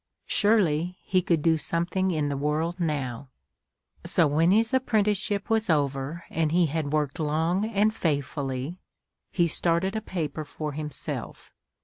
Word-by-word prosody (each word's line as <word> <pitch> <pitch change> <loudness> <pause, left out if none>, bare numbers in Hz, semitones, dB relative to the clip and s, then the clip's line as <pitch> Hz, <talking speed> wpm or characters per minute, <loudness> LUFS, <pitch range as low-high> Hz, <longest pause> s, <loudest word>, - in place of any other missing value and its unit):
Surely, 180 -5 +2
he 185 -1 +2
could 170 -4 +1
do 165 -1 +4
something 175 +4 0
in 155 -4 0
the 140 - -1
world 155 +5 -1
now; 140 -6 -2 0.7
so 165 - +3
when 155 +4 +3
his 225 +5 +3
apprenticeship 210 -5 +1
was 225 -2 +1
over 145 +1 0
and 160 -1 0
he 175 +1 +4
had 155 -1 -2
worked 150 +1 -1
long 160 +6 +1
and 215 0 +2
faithfully, 140 - -2 0.5
he 175 - +2
started 170 +4 0
a 220 - -1
paper 160 -7 -4
for 150 +1 -5
himself. 150 0 -6
165 Hz, 140 wpm, -26 LUFS, 150-190 Hz, 0.7 s, do